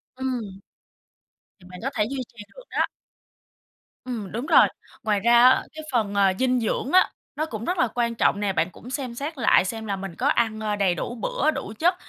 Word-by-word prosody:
Ừm. 260 -2 -2 1.2
Thì 180 - -17
bạn 180 - -10
có 270 - 0
thể 210 -2 +2
duy 270 0 -4
trì 220 -3 -12
được - - -12
đó. - - +1 1.2
Ừm, 225 -6 -5
đúng 235 +5 -4
rồi. 330 - +6 0.4
Ngoài 210 -2 +1
ra 235 +3 +5
á, 260 - +3
cái 315 0 -8
phần, 215 -5 0
à, 195 -1 +4
dinh 255 -1 +2
dưỡng 235 +4 -1
á, 370 +1 +5 0.3
nó 310 - -1
cũng 225 -7 -6
rất 360 - -1
là 250 - +3
quan 235 0 -1
trọng 200 - +2
nè, 205 -2 0
bạn 165 +1 +1
cũng 235 - -13
xem 260 -3 -4
xét 290 +5 -5
lại 230 -6 +4
xem 220 +3 -4
là 200 -2 -2
mình 190 -3 -7
có 260 - 0
ăn, 225 -6 +1
ơ, 215 -1 -1
đầy 195 -3 +1
đủ 240 - -4
bữa, 280 +6 0
đủ 215 - -6
chất 350 +3 +3
235 Hz, 220 wpm, -24 LUFS, 205-260 Hz, 1.2 s, rồi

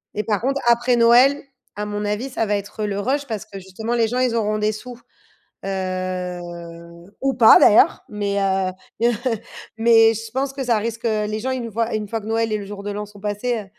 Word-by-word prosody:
Et 210 - -1
par 210 0 -1
contre, 275 +2 0
après 240 +1 +3
Noël, 245 +4 +5 0.3
à 210 0 -3
mon 210 0 -4
avis, 210 +6 -2
ça 235 -3 -1
va 205 -1 0
être, 205 +2 -6
heu, - - 0
le 200 0 -3
rush. 275 +6 -1
Parce 220 -3 -4
que 195 - -9
justement 205 +5 -4
les 230 -1 +2
gens 245 +3 -2
ils 250 -2 +1
auront 215 -1 0
des 215 0 +1
sous. 245 +3 -9 0.7
Heu, 185 -2 -3 0.8
ou 270 0 +1
pas 225 -3 +8
d'ailleurs, 210 - +5
mais, 200 -1 -2
heu, 190 -1 +1 0.3
mais 235 - +3
heu, - - -2 0.6
mais, 225 0 +5
je 225 +1 -7
pense 270 +2 -2
que, 270 -1 -4
ça 235 -3 +2
risque, 230 +2 -4
heu, 215 -2 +1
les 215 +1 -3
gens 260 +4 -2
ils 260 -1 -2
nous 230 - -6
voient 230 +2 -1
une 210 -1 -3
fois 225 +2 -3
que 210 - -10
Noël 225 0 0
et - - +1
le 205 - -7
jour 200 0 -8
de 205 - -4
l'an 210 +1 -4
sont 205 0 -16
passés, 210 +4 -2
heu, 210 - -8
220 Hz, 240 wpm, -21 LUFS, 205-235 Hz, 0.8 s, pas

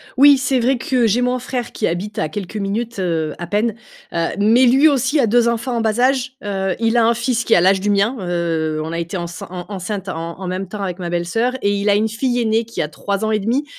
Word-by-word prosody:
Oui, 280 +1 +7
c'est 260 -1 +1
vrai 255 +2 +2
que 250 -1 +1
j'ai 235 +4 +2
mon 250 0 0
frère 250 0 -4
qui - - -1
habite 195 +5 -4
à 155 - -1
quelques 205 0 -6
minutes, 215 +2 -3
heu, 160 -4 -1
à 175 - -5
peine. 210 +4 0 0.4
Heu, 170 -1 0
mais 230 +5 +5
lui 270 +6 +5
aussi 280 +1 +2
a 240 - +3
2 235 +2 +3
enfants 235 +2 -1
en - - 0
bas 220 +1 0
âge, 255 0 +1
heu, 195 -2 -2
il 225 +1 +1
a 230 - +4
un 235 - +4
fils 235 0 -1
qui - - +3
a 170 - +4
l'âge 190 +1 +4
du 205 - -1
mien. 205 +5 +2
Heu, 165 -3 -1
on 160 - -5
a 170 - -3
été 170 +3 -4
encein 170 0 -6
en 180 -1 -7
enceinte 195 0 -5
en 165 +1 -5
en 190 - -5
même 185 +1 -3
temps 205 +1 -7
avec 185 -1 -4
ma 175 -1 -4
belle-soeur, 175 +9 0
et 200 0 +1
il 200 +1 0
a 200 - +4
une 215 +2 +2
fille 245 +2 -1
aînée 225 0 +1
qui 230 - -4
a 150 - -1
3 200 +6 -3 0.2
et 215 - +2
1/2. 245 +8 0
210 Hz, 260 wpm, -19 LUFS, 180-240 Hz, 0.4 s, Oui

